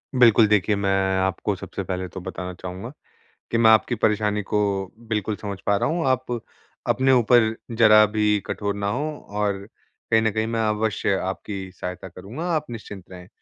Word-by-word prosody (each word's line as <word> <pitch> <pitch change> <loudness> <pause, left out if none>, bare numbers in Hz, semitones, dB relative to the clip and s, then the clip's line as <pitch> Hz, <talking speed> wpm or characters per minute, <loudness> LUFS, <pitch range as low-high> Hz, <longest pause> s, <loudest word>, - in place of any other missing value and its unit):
बिल्कुल, 115 -3 +6
देखिए, 105 0 +2
मैं 100 -1 0 0.3
आपको 95 -1 -1
सबसे - - -6
पहले 95 0 -3
तो 95 +2 -8
बताना 90 0 -6
चाहूँगा 95 +5 -6 0.6
कि 115 - +2
मैं 110 -1 +6
आपकी 110 +2 +3
परेशानी 105 -1 +1
को, 100 -1 -1 0.2
बिल्कुल 105 -1 -1
समझ 100 -2 -6
पा 100 - +3
रहा - - 0
हूँ। 165 -2 -1
आप 130 0 +1 0.6
अपने 130 0 +3
ऊपर 120 -2 +4 0.2
ज़रा 110 -2 +6
भी 105 0 +1
कठोर 100 -1 -3
ना 100 0 -2
हों, 145 +6 -3
और 105 -1 -2 0.5
कहीं 110 0 +5
न 110 -1 +1
कहीं 110 +1 -1
मैं 115 0 -1
अवश्य 105 -2 0
आपकी 95 0 -5
सहायता 90 +1 -7
करूँगा, 100 - -8
आप 150 -1 -1
निश्चिंत 105 -4 -9
रहें। 90 -1 -11
105 Hz, 175 wpm, -23 LUFS, 95-115 Hz, 0.6 s, बिल्कुल